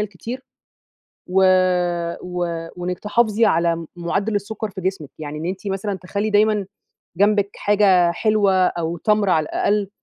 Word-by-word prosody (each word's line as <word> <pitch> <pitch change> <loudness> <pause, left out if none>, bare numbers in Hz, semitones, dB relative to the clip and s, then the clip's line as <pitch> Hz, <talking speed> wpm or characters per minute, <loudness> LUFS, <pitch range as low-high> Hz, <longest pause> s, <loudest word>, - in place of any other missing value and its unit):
الكتير. 215 +6 -5 0.9
و 190 +1 +2 0.8
و 175 -2 -3
وإنِّك 180 0 -4
تحافظي 220 +1 +2
على 170 -5 +2
مُ 165 0 -7
معدّل 195 +5 -2
السكر 215 +2 -3
في 190 -1 -8
جسمِك. 185 -6 -3
يعني 150 -1 -6
إن 160 - -5
أنتِ 190 +3 -4
مثلًا 195 +1 -2
تخلّي 200 +3 -3
دايمًا 210 -1 +2 0.5
جنبِك 205 0 +3
حاجة 195 -4 +3
حلوة، 210 +1 +2
أو 170 0 -3
تَمْر 210 +1 +1
على 155 -3 +3
الأقل، 205 +4 0
195 Hz, 145 wpm, -21 LUFS, 175-210 Hz, 0.9 s, جنبِك